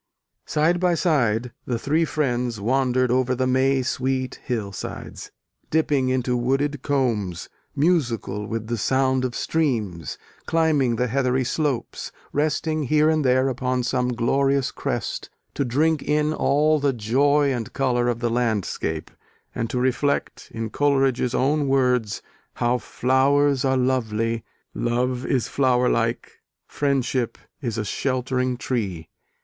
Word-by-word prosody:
Side 165 Hz, +4 st, +2 dB
by 180 Hz, -1 st, +2 dB
side 125 Hz, -, +1 dB, 0.2 s
the 120 Hz, -, 0 dB
three 155 Hz, +7 st, +1 dB
friends 125 Hz, -6 st, -1 dB
wandered 130 Hz, +2 st, +1 dB
over 130 Hz, 0 st, +2 dB
the 130 Hz, +1 st, 0 dB
May 130 Hz, +1 st, +2 dB
sweet 130 Hz, +1 st, -2 dB
hillsides, 105 Hz, -6 st, -5 dB, 0.4 s
dipping 145 Hz, -4 st, +1 dB
into 125 Hz, -1 st, 0 dB
wooded 135 Hz, +3 st, 0 dB
combes, 115 Hz, -, -1 dB, 0.3 s
musical 120 Hz, -, 0 dB
with 115 Hz, -1 st, -3 dB
the 115 Hz, 0 st, -3 dB
sound 130 Hz, +3 st, +1 dB
of 125 Hz, -2 st, -2 dB
streams, 110 Hz, -, -1 dB, 0.3 s
climbing 155 Hz, -7 st, +2 dB
the 125 Hz, -, 0 dB
heathery 130 Hz, +1 st, +1 dB
slopes, 135 Hz, -1 st, -2 dB, 0.2 s
resting 155 Hz, +1 st, 0 dB
here 155 Hz, +3 st, +3 dB
and 155 Hz, -1 st, +1 dB
there 130 Hz, 0 st, +3 dB
upon 125 Hz, -1 st, -1 dB
some 125 Hz, +1 st, 0 dB
glorious 135 Hz, +3 st, +1 dB
crest -, -, -3 dB, 0.2 s
to -, -, 0 dB
drink 150 Hz, +5 st, +1 dB
in 150 Hz, +1 st, +1 dB
all 150 Hz, +1 st, +2 dB
the 140 Hz, -1 st, +1 dB
joy 140 Hz, +5 st, +2 dB
and 115 Hz, -4 st, -4 dB
colour 125 Hz, -3 st, +1 dB
of 120 Hz, -1 st, -1 dB
the 120 Hz, -, +1 dB
landscape, 110 Hz, -9 st, -1 dB, 0.4 s
and 115 Hz, -, -3 dB
to -, -, -2 dB
reflect, 130 Hz, +3 st, -1 dB
in 115 Hz, -1 st, -4 dB
Coleridge's 135 Hz, -4 st, +1 dB
own 145 Hz, +2 st, +1 dB
words, 125 Hz, -5 st, +1 dB, 0.3 s
how 120 Hz, +1 st, +1 dB
Flowers 135 Hz, +3 st, +2 dB
are 130 Hz, -1 st, +2 dB
lovely; 115 Hz, -3 st, 0 dB, 0.3 s
Love 125 Hz, +1 st, -1 dB
is 130 Hz, -4 st, +1 dB
flower 125 Hz, -2 st, +2 dB
like; 115 Hz, 0 st, -1 dB, 0.2 s
Friendship 130 Hz, -4 st, -1 dB, 0.2 s
is 115 Hz, -5 st, -3 dB
a 110 Hz, -, -2 dB
sheltering 130 Hz, +2 st, -1 dB
tree. 100 Hz, -11 st, -3 dB
130 Hz, 130 wpm, -23 LUFS, 120-140 Hz, 0.4 s, here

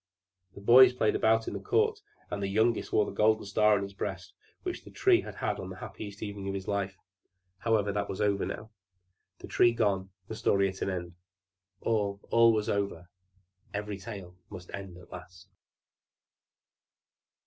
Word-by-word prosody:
The 100 Hz, -, -10 dB
boys 125 Hz, +5 st, +8 dB
played 110 Hz, -4 st, +1 dB
about 110 Hz, 0 st, +3 dB
in -, -, -3 dB
the -, -, -4 dB
court, 440 Hz, +1 st, +1 dB, 0.3 s
and 100 Hz, -, -3 dB
the 100 Hz, -, 0 dB
youngest 110 Hz, +4 st, +1 dB
wore 105 Hz, -, +3 dB
the -, -, -5 dB
gold 110 Hz, +1 st, +2 dB
star 105 Hz, +1 st, +4 dB
on 100 Hz, -, -2 dB
his 100 Hz, 0 st, -7 dB
breast -, -, -5 dB, 0.3 s
which 360 Hz, -1 st, -4 dB
the -, -, -12 dB
Tree 375 Hz, -3 st, +3 dB
had -, -, -9 dB
had -, -, -2 dB
on -, -, -6 dB
the -, -, -7 dB
happiest 100 Hz, -1 st, -8 dB
evening 100 Hz, -2 st, -5 dB
of 100 Hz, -, -2 dB
his 95 Hz, -1 st, -5 dB
life. 100 Hz, -2 st, -2 dB, 0.6 s
However, 110 Hz, -3 st, +1 dB
that 100 Hz, 0 st, -2 dB
was 95 Hz, -, -4 dB
over 100 Hz, -2 st, +1 dB
now 110 Hz, +1 st, -5 dB, 0.7 s
the -, -, -10 dB
Tree 120 Hz, -, +4 dB
gone, 100 Hz, -4 st, 0 dB, 0.2 s
the -, -, -6 dB
story 100 Hz, 0 st, +2 dB
at 95 Hz, -, -9 dB
an -, -, 0 dB
end. 90 Hz, -2 st, -4 dB, 0.7 s
All, 100 Hz, -3 st, 0 dB
all 115 Hz, 0 st, +6 dB
was 110 Hz, -1 st, 0 dB
over 100 Hz, -4 st, -2 dB, 0.7 s
every 105 Hz, -1 st, -4 dB
tale 95 Hz, -4 st, -8 dB
must 90 Hz, 0 st, -10 dB
end 95 Hz, -3 st, -7 dB
at 90 Hz, -, -16 dB
last. 90 Hz, 0 st, -11 dB
100 Hz, 180 wpm, -30 LUFS, 95-110 Hz, 0.7 s, boys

